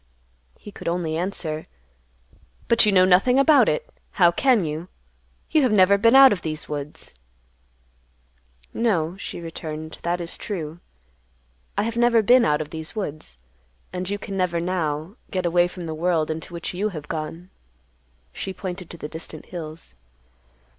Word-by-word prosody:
He 205 - -11
could - - -9
only 170 -2 -1
answer, 165 -3 -3 1.0
"But 230 -2 +6
you - - +5
know 185 -1 +6
nothing 190 +8 +4
about 285 +1 +6
it. - - -1 0.3
How 175 -3 +5
can 240 -1 +3
you? 155 +3 -4 0.6
You 315 - +4
have 255 -4 +2
never 200 -1 +6
been 230 +5 +4
out 270 -1 +9
of 190 - -1
these 155 -1 -4
woods." 150 0 -6 1.6
"No," 180 -8 0
she 195 - -6
returned, 160 -1 -7
"that 175 +1 -1
is 170 -1 -4
true; 170 -6 -5 1.0
I - - +2
have 230 +1 -3
never 235 -1 +4
been 245 +4 +6
out 150 0 +2
of 150 - -7
these 160 +5 -7
woods, 155 - -5 0.6
and 180 0 -3
you 205 - -1
can 200 -1 -7
never, 180 -3 0
now, 170 - -2
get 185 -1 -2
away 175 +1 +3
from 175 -1 -8
the 160 - -4
world 160 -1 0
into 160 +1 -6
which 170 +1 -5
you 200 +4 -1
have 155 -6 -8
gone." 165 +4 -6 0.8
She 190 - -5
pointed 180 -2 -6
to 170 - -9
the 150 - -6
distant 160 0 -8
hills. 160 - -8
175 Hz, 160 wpm, -23 LUFS, 160-200 Hz, 1.6 s, out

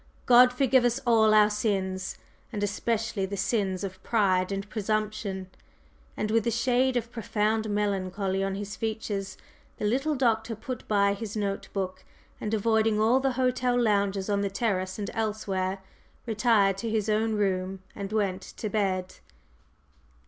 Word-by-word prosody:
God 250 0 +7
forgive 260 0 +3
us 245 +1 +2
all 225 -2 +5
our 210 0 +6
sins, 190 -3 -1 0.3
and 210 -3 -3
especially 210 -1 -1
the 200 +1 -5
sins 195 -2 0
of 190 -1 -6
pride 190 -5 +2
and 195 +1 -3
presumption!" 210 -3 -2 0.7
And 215 0 -1
with 225 0 +2
a - - +4
shade 250 +2 +2
of 235 0 -3
profound 220 -1 -1
melancholy 195 -1 -1
on 195 0 -1
his 200 0 -5
features, 215 -3 -3 0.4
the - - -3
little 270 +8 +1
Doctor 230 -3 +1
put 245 +3 -7
by 200 -1 +3
his 210 +1 -5
note 200 -1 -2
book, 185 -1 -4 0.4
and, 210 - -3
avoiding 220 0 +2
all 230 +4 +4
the 265 -1 0
hotel 250 -1 +1
loungers 200 -4 +1
on 200 -1 +1
the 200 - 0
terrace 190 -3 -1
and 205 -2 -4
elsewhere, 195 -3 -2 0.4
retired 215 -4 +2
to 230 - -3
his 215 -1 0
own 220 +1 +1
room 190 -2 -1
and 200 0 -5
went 195 -3 0
to 215 +3 -6
bed. 190 -3 -1
210 Hz, 155 wpm, -27 LUFS, 195-225 Hz, 0.7 s, God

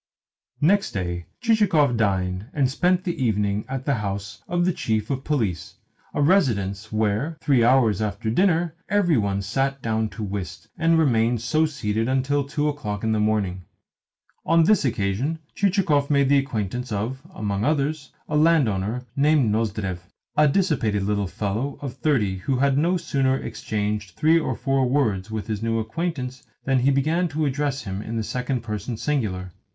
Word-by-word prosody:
Next 195 +6 +3
day 90 -3 -3
Chichikov 195 - +3
dined 95 -2 0
and 135 -3 +1
spent 180 +5 +2
the 170 -7 -2
evening 105 -2 0
at 135 0 -4
the 140 - +2
house 100 -2 -4
of 175 0 +1
the 185 - +2
Chief 110 -4 -1
of 135 -1 -2
Police 110 - -2 0.4
a 145 - +2
residence 110 - +1
where, 110 +9 0
three 135 -7 +3
hours 115 -5 +4
after 110 +1 -2
dinner, 170 - +2 0.2
every 190 -5 +3
one 100 -1 -1
sat 135 +7 -1
down 110 -1 0
to 110 - -7
whist, 95 -3 -5
and 165 0 +3
remained 120 -6 +2
so 155 +7 +2
seated 115 -6 -2
until 135 +2 +1
two 145 +2 -1
o'clock 105 -9 -3
in 110 - +1
the 110 - +1
morning. 100 -4 0 0.8
On 165 0 +4
this 205 +1 +4
occasion 115 +7 -1 0.2
Chichikov 175 -8 +2
made 140 -2 +3
the 140 0 +5
acquaintance 125 -2 -3
of, 115 +6 -3
among 105 - -2
others, 145 0 0 0.2
a - - -2
landowner 125 - +2
named 145 -5 +3
Nozdrev 105 -4 -1 0.4
a 150 0 +5
dissipated 140 - +1
little 100 0 0
fellow 110 +9 -3
of 135 -4 -5
thirty 120 -8 0
who 125 +8 -1
had 135 +1 +2
no 170 +6 +2
sooner 135 -5 +1
exchanged 105 -5 -3
three 160 +2 +4
or - - -2
four 135 -2 +1
words 110 -8 0
with 110 -1 -4
his 110 -2 -3
new 115 0 0
acquaintance 130 +2 -3 0.2
than 135 -1 +2
he 130 +3 +3
began 155 +6 +2
to 155 0 -1
address 140 -1 -1
him 95 -1 -4
in 115 +1 -5
the 110 - -1
second 125 +2 -2
person 110 +1 -4
singular. 105 -11 -2
125 Hz, 165 wpm, -24 LUFS, 105-150 Hz, 0.8 s, the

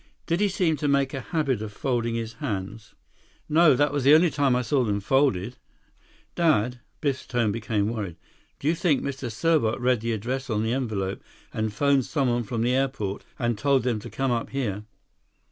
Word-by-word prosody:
Did 170 +1 0
he 205 - +3
seem 180 -5 +1
to 145 - -1
make 140 -1 +2
a 135 - -3
habit 140 -8 -1
of 110 -1 -5
folding 115 0 -1
his 115 0 -4
hands?" 105 -4 -5 0.5
"No, 155 -2 +5
that 145 +2 +2
was 145 -2 0
the 140 +3 +7
only 165 +1 +4
time 140 -3 +2
I 125 - +1
saw 130 +3 +1
them 105 -3 0
folded. 125 -2 +1 0.8
Dad"—Biff's 135 -2 0
tone 120 -4 +1
became 110 -2 -1
worried—"do 105 - -7
you 160 - +4
think 165 -5 +1
Mr. 135 -3 -4
Serbot 140 -3 +1
read 125 -2 +2
the 115 0 -1
address 125 +5 -3
on 110 -1 0
the 110 +1 0
envelope 105 -7 -2 0.3
and 110 0 -1
phoned 140 +3 +2
someone 125 -5 0
from 115 0 -2
the 125 +1 +2
airport, 130 -7 -1
and 120 -4 -1
told 135 0 +2
them 120 -3 0
to - - -9
come 135 -1 -1
up 115 -1 -1
here?" 105 -7 -3
125 Hz, 185 wpm, -25 LUFS, 110-140 Hz, 0.8 s, the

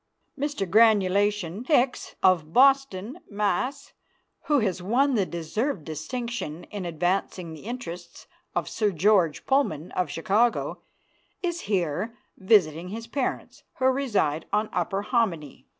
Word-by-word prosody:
Mr. 285 -8 -2
Granulation 205 -1 +3
Hicks, 260 -4 +1
of 170 -4 +3
Boston, 265 -3 +3
Mass., 210 +7 -2 0.5
who 295 - +3
has 190 -7 0
won 255 +9 +2 0.2
deserved 170 - -2
distinction 180 - -5
in 200 -3 -5
advancing 175 0 -1
the 160 - -11
interests 175 -8 -7 0.3
of - - -1
Sir 215 -2 0
George 180 -2 +2
Pullman, 180 - 0
of 180 -4 -1
Chicago, 210 +10 +1 0.6
is 345 -1 -2
here 190 +4 -1 0.2
visiting 180 -5 +3
his 225 +4 -6
parents, 255 +3 -3 0.2
who 260 - 0
reside 225 - +1
on 210 +1 +1
Upper 195 0 -1
Hominy. 190 - -1
205 Hz, 120 wpm, -26 LUFS, 175-245 Hz, 0.6 s, Granulation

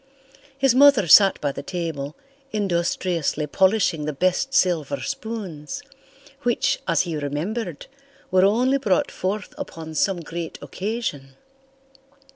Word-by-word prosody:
His 270 -2 +3
mother 265 -7 +6
sat 195 +4 +7
by 145 - 0
the - - -6
table, 160 -5 -4 0.4
industriously 175 -5 -1
polishing 185 -1 +2
the 150 - -2
best 185 - 0
silver 165 - +1
spoons, 215 - -5 0.6
which, 245 -3 +1
as 165 -2 +3
he 170 -3 -3
remembered, 155 +5 -4 0.5
were 185 0 +4
only 250 +7 +3
brought 195 -9 +1
forth 200 +3 -3
upon 160 -1 -7
some 175 +3 +1
great 165 0 -6
occasion. 185 - -4
180 Hz, 115 wpm, -23 LUFS, 155-215 Hz, 0.6 s, sat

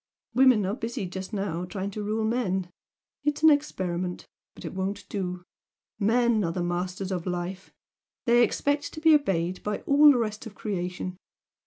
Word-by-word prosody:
Women 250 -4 +5
are 195 - -1
busy 230 -4 -4
just 190 +2 -6
now 195 -5 -2
trying 195 +1 -4
to 210 - -5
rule 215 +2 -1
men 190 -6 -1 0.5
it's 295 +1 -1
an 315 - +9
experiment, 185 -11 -1 0.3
but - - -10
it - - -5
won't 190 +2 -3
do! 180 -3 -3 0.6
Men 230 +1 +3
are 165 - 0
the 175 +1 -2
masters 180 +2 -2
of 180 -1 -3
life! 180 +1 -4 0.5
They 240 0 +5
expect 285 +3 0
to - - -6
be 320 0 +6
obeyed 185 - +1
by 210 0 -3
all 290 +1 +7
the 265 - +3
rest 215 -2 -2
of 210 - -12
creation. 180 -2 -4
200 Hz, 170 wpm, -27 LUFS, 180-235 Hz, 0.6 s, an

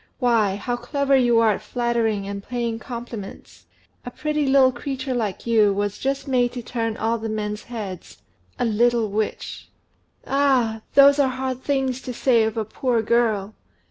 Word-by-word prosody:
Why, 225 -6 +2
how 240 +4 -3
clever 280 +2 0
you 240 -3 +4
are 225 -1 +4
at 205 - -3
flattering 225 -3 -1
and 200 0 -5
paying 235 -1 -3
compliments! 235 -3 -9 0.4
A - - -6
pretty 300 +2 -2
little 265 -1 +5
creature 265 +1 -4
like 215 -6 -3
you 220 -3 +4
was 205 0 -2
just 275 +1 -2
made 245 -2 +1
to 245 -1 -6
turn 225 -2 -3
all 225 +1 0
the 225 0 -4
men's 210 -1 -4
heads 210 -7 -7 0.4
a 245 - 0
little 230 -1 +2
witch." 215 +1 -4 0.6
"Ah! 260 -6 +2
those 280 +1 +7
are 275 -2 +4
hard 260 0 -4
things 265 -2 -1
to 250 -3 -6
say 240 -3 +3
of 220 +1 -3
a 220 - -1
poor 235 +1 -1
girl! 220 -3 +1
235 Hz, 170 wpm, -23 LUFS, 220-260 Hz, 0.6 s, those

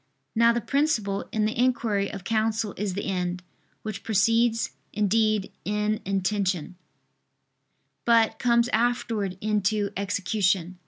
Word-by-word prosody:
Now 230 +1 +5
the 235 0 -1
principle 225 -10 0
in 215 -1 +1
the 215 - -1
inquiry 230 -5 +1
of 195 -3 -7
counsel 220 -1 0
is 195 -2 -3
the 200 - -3
end, 180 -2 -2 0.4
which 215 -2 -5
precedes 230 +2 +2 0.2
indeed 215 0 +1
in 210 +1 -1
intention, 190 -3 -1 1.3
but 230 -2 +3
comes 235 -1 +3
afterwards 230 -6 0
into 210 -1 0
execution. 190 -2 0
210 Hz, 115 wpm, -26 LUFS, 195-230 Hz, 1.3 s, Now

